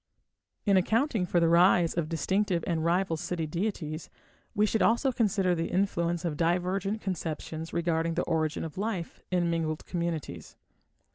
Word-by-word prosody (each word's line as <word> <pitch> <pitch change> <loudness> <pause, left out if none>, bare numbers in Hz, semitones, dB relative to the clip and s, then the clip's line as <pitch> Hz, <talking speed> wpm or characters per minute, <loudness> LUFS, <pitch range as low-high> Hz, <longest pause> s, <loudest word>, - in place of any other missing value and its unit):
In 200 -2 +4
accounting 220 - +1
for 175 - +2
the 165 - +3
rise 170 0 +5
of 165 -3 -2
distinctive 180 +1 0
and 165 -2 -1
rival 170 0 +1
city 165 0 -3
deities, 165 -2 -3 0.5
we 210 - +4
should 215 0 0
also 235 +7 +3
consider 200 -6 +1
the 165 -1 -1
influence 175 -3 0
of 155 -3 -2
divergent 185 +5 0
conceptions 165 -3 -4
regarding 165 -1 0
the 175 - +1
origin 155 -2 -1
of 160 +2 -6
life 200 -5 -3
in 175 -2 +1
mingled 160 -2 -2
communities. 170 -4 -4
175 Hz, 150 wpm, -29 LUFS, 165-195 Hz, 0.5 s, rise